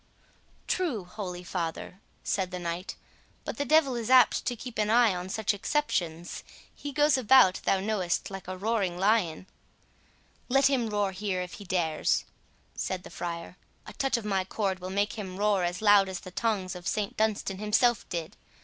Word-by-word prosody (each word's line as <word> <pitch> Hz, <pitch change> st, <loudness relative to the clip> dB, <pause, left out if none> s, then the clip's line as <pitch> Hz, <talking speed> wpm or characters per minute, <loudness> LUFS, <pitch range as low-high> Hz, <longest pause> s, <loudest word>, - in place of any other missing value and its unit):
"True, 305 Hz, -, -1 dB
holy 180 Hz, -2 st, -6 dB
father," 175 Hz, +2 st, -4 dB, 0.2 s
said 190 Hz, -2 st, -1 dB
the 180 Hz, -, -5 dB
knight; 175 Hz, +1 st, -4 dB, 0.5 s
"but -, -, -5 dB
the 285 Hz, -, -1 dB
devil 285 Hz, -2 st, +4 dB
is 235 Hz, -1 st, -3 dB
apt 255 Hz, -2 st, +5 dB
to 245 Hz, -, -1 dB
keep 240 Hz, 0 st, -7 dB
an 210 Hz, 0 st, +1 dB
eye 230 Hz, -2 st, +5 dB
on 180 Hz, +1 st, -5 dB
such 215 Hz, +1 st, 0 dB
exceptions; 180 Hz, -, -2 dB, 0.3 s
he 290 Hz, -, -7 dB
goes 295 Hz, 0 st, +3 dB
about, 245 Hz, -5 st, +5 dB
thou 195 Hz, -, +3 dB
knowest, 195 Hz, -3 st, -1 dB
like 195 Hz, -2 st, -7 dB
a 185 Hz, 0 st, -5 dB
roaring 200 Hz, -3 st, 0 dB
lion." 190 Hz, -4 st, +1 dB, 1.0 s
"Let 270 Hz, +2 st, +4 dB
him 245 Hz, -5 st, +1 dB
roar 205 Hz, -2 st, 0 dB
here 190 Hz, -1 st, -2 dB
if 180 Hz, -, -9 dB
he 205 Hz, -, -9 dB
dares," 170 Hz, -4 st, 0 dB, 0.5 s
said 185 Hz, -1 st, -3 dB
the -, -, -11 dB
friar; 170 Hz, +1 st, -6 dB, 0.3 s
"a -, -, -10 dB
touch 270 Hz, -2 st, 0 dB
of 230 Hz, -, -6 dB
my 195 Hz, -2 st, +1 dB
cord 190 Hz, 0 st, -2 dB
will 185 Hz, 0 st, -6 dB
make 205 Hz, +3 st, -1 dB
him 190 Hz, -3 st, -6 dB
roar 205 Hz, -2 st, +2 dB
as 175 Hz, +4 st, -2 dB
loud 205 Hz, -2 st, +6 dB
as 185 Hz, -2 st, -5 dB
the 185 Hz, -, -10 dB
tongs 195 Hz, -3 st, -1 dB
of 180 Hz, 0 st, -8 dB
St 210 Hz, -2 st, -1 dB
Dunstan 210 Hz, -3 st, -1 dB
himself 225 Hz, +3 st, +2 dB
did. 170 Hz, -3 st, -4 dB
200 Hz, 180 wpm, -28 LUFS, 180-225 Hz, 1.0 s, loud